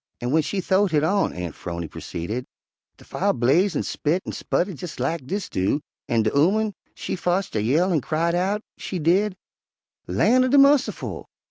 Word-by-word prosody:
"An' 120 - -3
w'en 160 +4 +3
she 190 +5 -2
th'owed 190 +2 +2
hit 150 -1 +3
on," 195 +5 +2
Aunt 90 -2 -5
'Phrony 85 -1 -5
proceeded, 105 +12 -5 0.5
"de - - -17
fire - - 0
blaze 155 - +2
an' - - 0
spit 165 +5 -1
an' - - -4
sputter 190 +3 -1
jes' 170 -2 -8
lak 135 +1 -2
dis 200 +4 -3
do, 95 +10 0 0.3
an' 115 -2 +2
de 110 - +1
ooman 205 +8 +3 0.2
she - - -4
fotched 180 -1 -1
a 105 - +1
yell 160 - +2
an' 155 - +2
cried 165 +5 0
out, 195 +5 0 0.2
she 190 - -4
did, 185 +5 +2 0.7
'Lan' 255 +2 +3
er - - +2
de 275 +3 +4
mussiful! 275 0 +3
170 Hz, 190 wpm, -23 LUFS, 130-195 Hz, 0.7 s, de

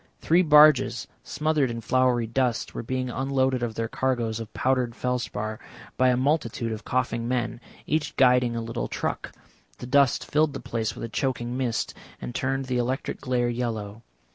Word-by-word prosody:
Three 170 - +3
barges, 150 -6 +5 0.2
smothered 150 -2 0
in 115 0 -4
floury 125 +1 +2
dust, 120 0 -1
were - - -4
being 130 +1 -3
unloaded 130 -1 0
of 115 -2 -2
their 115 0 -1
cargoes 120 -3 -1
of 115 -2 -7
powdered 125 -2 0
felspar 110 -4 -3 0.4
by 130 +1 +4
a 125 - +2
multitude 130 -4 0
of 110 0 -5
coughing 120 -2 -1
men, 120 -1 -2 0.2
each 150 -1 -1
guiding 125 -2 +4
a 115 - -2
little 115 0 -3
truck; - - -3 0.5
the - - -8
dust 135 0 +3
filled 150 -1 +2
the 135 - -5
place 115 -3 -3
with - - -7
a - - -2
choking 120 0 -2
mist, 125 -3 -1 0.3
and - - -6
turned 135 +1 -1
the 125 -1 -1
electric 130 +3 -2
glare 125 -2 0
yellow. 115 -3 -3
125 Hz, 170 wpm, -26 LUFS, 115-130 Hz, 0.5 s, barges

